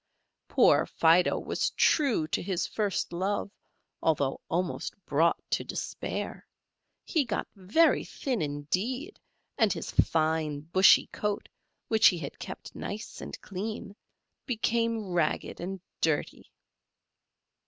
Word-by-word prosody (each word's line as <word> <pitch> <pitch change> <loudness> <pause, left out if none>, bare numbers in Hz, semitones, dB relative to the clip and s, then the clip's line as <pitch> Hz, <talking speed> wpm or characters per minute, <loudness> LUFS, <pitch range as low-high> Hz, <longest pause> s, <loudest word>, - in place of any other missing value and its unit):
Poor - - +4
Fido 170 +2 +4
was - - -1
true 255 - +2
to - - 0
his 185 -1 -1
first 205 -5 -2
love, 195 +3 -1 0.5
although 145 -4 +1
almost 175 +1 -2
brought 160 +4 +3
to - - +1
despair; - - -5 0.6
he 315 - +2
got 230 -5 -3
very 210 - +3
thin 255 -7 -3
indeed, 185 - -2 0.4
and 220 -4 +4
his - - -4
fine 155 -2 +1
bushy 180 +5 +6
coat, 210 -1 -2 0.4
which 220 -1 +6
he 180 - +4
had 145 -4 -7
kept - - -8
nice 210 +2 -6
and - - -7
clean, 205 +1 -5 0.5
became 230 -3 0
ragged 170 -3 0
and 190 +2 -4 0.2
dirty. 155 -3 -1
190 Hz, 115 wpm, -29 LUFS, 160-220 Hz, 0.6 s, bushy